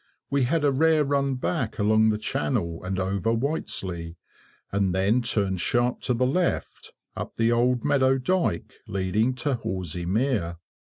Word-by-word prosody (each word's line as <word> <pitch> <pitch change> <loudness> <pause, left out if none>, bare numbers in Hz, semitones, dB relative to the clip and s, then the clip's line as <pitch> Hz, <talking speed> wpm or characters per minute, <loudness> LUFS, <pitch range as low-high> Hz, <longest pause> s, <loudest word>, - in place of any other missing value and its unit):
We 140 -2 +2
had 160 +4 +1
a 145 - +4
rare 155 +2 +3
run 140 -1 0
back 120 -2 -2
along 110 +1 +4
the 105 - +1
channel, 85 -3 -2
and 95 +1 -3
over 95 +3 0
Whiteslea, 95 - -2 0.6
and 95 -2 +1
then 100 +6 +2
turned 100 -6 0
sharp 120 +5 +1
to 125 - 0
the 125 +2 +1
left, 175 +7 -1 0.2
up - - -6
the 115 0 +2
Old 120 +2 +2
Meadow 135 -2 +3
dyke 165 - -1
leading 100 +6 0
to 135 +3 -1
Horsey 90 -7 -3
Mere. 100 -5 0
115 Hz, 155 wpm, -25 LUFS, 95-135 Hz, 0.6 s, a